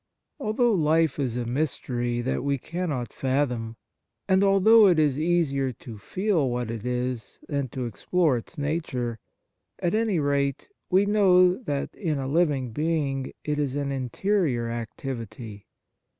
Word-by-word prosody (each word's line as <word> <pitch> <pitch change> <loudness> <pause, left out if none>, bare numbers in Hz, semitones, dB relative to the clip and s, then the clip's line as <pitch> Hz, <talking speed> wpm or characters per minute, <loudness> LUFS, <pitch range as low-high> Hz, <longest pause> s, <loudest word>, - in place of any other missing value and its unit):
Although 240 -1 +2
life 160 -4 +2
is 125 -4 -1
a 120 - -2
mystery 120 -2 -1
that 130 +2 -2
we 140 0 +1
cannot 155 -4 -4
fathom, 125 -4 -1 0.5
and 190 +1 +4
although 200 +3 +6
it 175 -3 +4
is 150 -3 +2
easier 155 -5 +1
to 115 -2 -11
feel 185 - 0
what 120 -1 -2
it 115 -2 -5
is 125 -1 -3
than 140 -3 -1
to 125 +1 -4
explore 150 - +1
its 120 +8 -10
nature, 140 -6 -2 0.6
at 175 - -1
any 220 -3 +1
rate 140 - 0 0.2
we 190 +2 +4
know 185 -3 +5
that 145 - -4
in 160 -7 -2
a 135 -1 -3
living 140 -5 +1
being 145 -1 -1
it 150 -1 -1
is 140 -2 -1
an 140 -1 -1
interior 135 - 0
activity. 115 -2 -6
140 Hz, 145 wpm, -26 LUFS, 125-175 Hz, 0.6 s, although